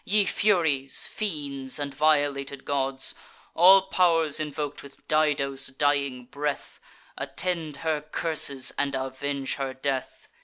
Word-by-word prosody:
Ye 205 0 +2
Furies, 160 -11 +2
fiends, 140 -10 -3
and 145 -1 -4
violated 145 -2 +1
gods, 135 -1 0 0.4
All 190 +3 +7
pow'rs 165 -6 +2
invok'd 150 -1 -4
with 140 -1 -16
Dido's 140 -3 +1
dying 140 -1 0
breath, 145 +2 -4 0.4
Attend 165 -5 -3
her 155 -2 0
curses 150 -4 0
and 140 -1 0
avenge 135 +1 -3
her 135 -1 -3
death! 135 -1 -4
145 Hz, 115 wpm, -26 LUFS, 135-155 Hz, 0.4 s, All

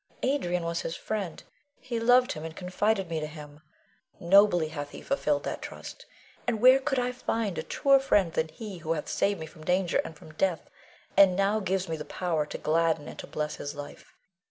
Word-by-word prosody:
Adrian 180 -11 0
was 170 0 -1
his 165 - -4
friend; 200 -7 -4 0.4
he 240 -2 -3
loved 245 +2 +5
him, 155 -2 -5
and 160 0 -7
confided 195 +2 0
me 165 -1 -2
to 155 - -3
him. 150 -1 -11 0.6
Nobly 175 -3 +5
hath 145 -2 -5
he - - -10
fulfilled 285 +1 0
that - - -4
trust, - - -9 0.4
and 230 -3 0
where 255 +3 +7
could 270 0 -1
I 250 0 +1
find 225 -5 -2
a - - 0
truer 275 -1 +3
friend 205 -10 +2
than 160 - 0
he 205 +1 -8
who 160 0 -1
hath 150 - -4
saved 200 -2 0
me 160 - -5
from 160 0 -14
danger 180 +1 +2
and 160 - -9
from 155 - -14
death, 175 +1 -1 0.4
and 195 -2 +7
now 200 +3 +2
gives 190 -1 -1
me 160 -1 -3
the 150 - -5
power 160 -3 -2
to - - -5
gladden 160 -1 +1
and - - -9
to - - -7
bless 150 0 -3
his 145 +1 -5
life. 145 0 -10
180 Hz, 205 wpm, -28 LUFS, 160-220 Hz, 0.6 s, where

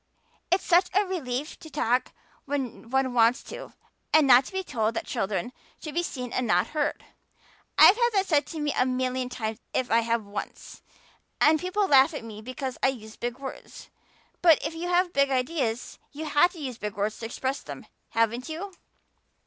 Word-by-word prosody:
It's 365 +2 +2
such 355 +1 +4
a 405 +1 +4
relief 300 -6 -4
to 315 - -11
talk 250 -4 0 0.3
when 265 -5 -4
one 265 0 +1
wants 235 +1 +3
to - - -9 0.4
and 310 -2 +6
not 255 0 +6
be 380 0 -2
told 230 -8 -1
that - - -3
children 210 +5 -2 0.3
should 305 - -7
be 345 - +1
seen 250 -7 -5
and 250 - 0
not 180 +2 +2
heard. 300 -1 -2 0.7
I've 390 - +9
had 475 -1 +3
that 390 -1 +2
said 295 -5 +2
to 325 - -6
me 295 -1 -1
a - - +3
million 255 0 -1
times 220 -2 -4 0.2
if 255 - 0
I 230 - +5
have 230 -1 -1
once. 200 +1 -7 0.6
And 310 +1 +5
people 370 +4 0
laugh 275 +1 +5
at 290 - -5
me 215 -1 -9
because 255 +2 -5
I - - +4
use 220 -5 -5
big 240 0 -4
words. 270 0 -9 0.5
But 330 -4 +7
if 310 - -2
you 335 +2 -4
have 355 0 +2
big 280 0 +3
ideas 255 -3 -2
you 310 +2 -6
have 310 +4 +4
to 345 - -11
use 255 -5 -5
big 210 -1 -4
words 210 +1 -2
to 225 - -4
express 260 +4 -3
them, - - -9 0.2
haven't 230 +4 0
you?" 370 +5 -6
265 Hz, 190 wpm, -27 LUFS, 235-315 Hz, 0.7 s, I've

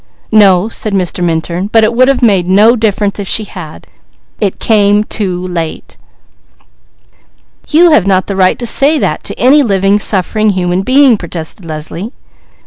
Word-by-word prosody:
"No," 200 -3 +4
said 215 -2 -4
Mr. 180 -2 -2
Minturn. 170 +2 -2
"But 225 -1 +3
it 215 +2 +1
would 255 +2 +3
have 270 -2 0
made 195 -6 +2
no 210 +6 +4
difference, 210 -3 -2
if 200 - -5
she 220 - -1
had. 165 - -11 0.5
It 200 -2 -2
came 210 -1 +2
too 185 -5 -3
late." 165 -3 -6 1.7
"You 335 +2 +4
have 210 - +3
not 190 -1 +1
the 200 - -5
right 185 -1 +1
to 240 - -5
say 280 +6 +2
that - - -2
to - - -4
any 275 +4 +4
living, 200 -4 +1
suffering 215 +2 +1
human 180 -1 -1
being!" 260 +1 +3
protested 170 0 -7
Leslie. 165 - -7
200 Hz, 160 wpm, -11 LUFS, 180-225 Hz, 1.7 s, No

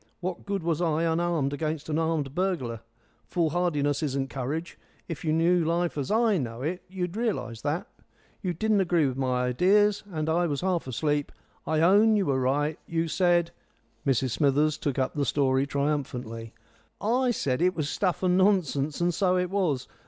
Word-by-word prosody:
What 185 +1 -5
good 200 -3 -2
was 165 0 0
I 165 -1 +1
unarmed 165 -4 0
against 155 0 -3
an 155 0 0
armed 160 -4 -1
burglar? 155 - -1 0.5
Foolhardiness 155 -3 0
isn't 135 -2 -2
courage. 145 +6 -4 0.3
If 165 -5 -6
you 155 - 0
knew 170 +2 +3
life 170 +2 0
as 140 -3 -3
I 220 -3 +3
know 120 -1 -5
it 180 +5 -2
you'd 180 -1 -4
realise 205 - -2
that. 150 +4 -2 0.6
You 180 -3 -2
didn't 215 +2 +2
agree 175 -4 +2
with 130 -2 -1
my 130 -2 0
ideas, 200 +11 +3
and, 155 -2 -2
as 160 - +2
I 175 +1 +2
was 145 -3 -2
half 180 -5 0
asleep, 145 +3 -1 0.4
I 160 0 +1
own 205 +6 +5
you 200 -2 +2
were 135 -3 +1
right; 145 +4 0
you 165 0 -1
said 175 0 +2 0.3
" 115 +2 -16
Mrs 130 -1 +1
Smithers 145 +3 +2
took 140 -3 -2
up 130 -1 0
the 145 - -1
story 135 0 +1
triumphantly. 125 -6 -3 0.4
"I 250 +4 +1
said 140 - 0
it 180 +1 +2
was 155 -3 -1
stuff 185 +3 -1
and 180 -1 +3
nonsense, 175 -7 +2
and 175 0 +2
so 185 +1 +2
it 180 0 -1
was. 165 -10 0
160 Hz, 180 wpm, -27 LUFS, 140-180 Hz, 0.6 s, own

